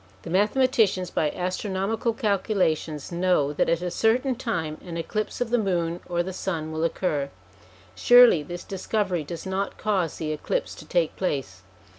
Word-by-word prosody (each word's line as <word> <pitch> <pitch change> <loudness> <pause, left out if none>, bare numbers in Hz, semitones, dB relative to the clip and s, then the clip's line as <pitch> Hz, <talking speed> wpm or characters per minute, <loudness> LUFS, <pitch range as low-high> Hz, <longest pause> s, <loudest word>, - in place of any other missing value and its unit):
The - - -7
mathematicians 210 -2 +2
by 155 - +1
astronomical 190 +6 -1
calculations 195 - 0
know 170 -5 +2
that - - +1
at 170 +1 +1
a 180 - -2
certain 250 +7 +2
time 170 -11 -3
an 170 -2 -6
eclipse 215 +8 -3
of 240 -2 -1
the 245 - +3
moon 175 -4 0
or 175 0 +1
the 190 +1 -5
sun 165 -4 -3
will 160 +1 -2
occur. 155 -4 -1 0.6
Surely 245 - +7
this 175 +4 -7
discovery 195 -3 -1
does 165 +4 -7
not 190 +1 -2
cause 190 -6 0
the 155 -1 -3
eclipse 150 - -2
to - - -11
take 165 -1 +1
place. 135 - -2
180 Hz, 160 wpm, -25 LUFS, 160-210 Hz, 0.6 s, Surely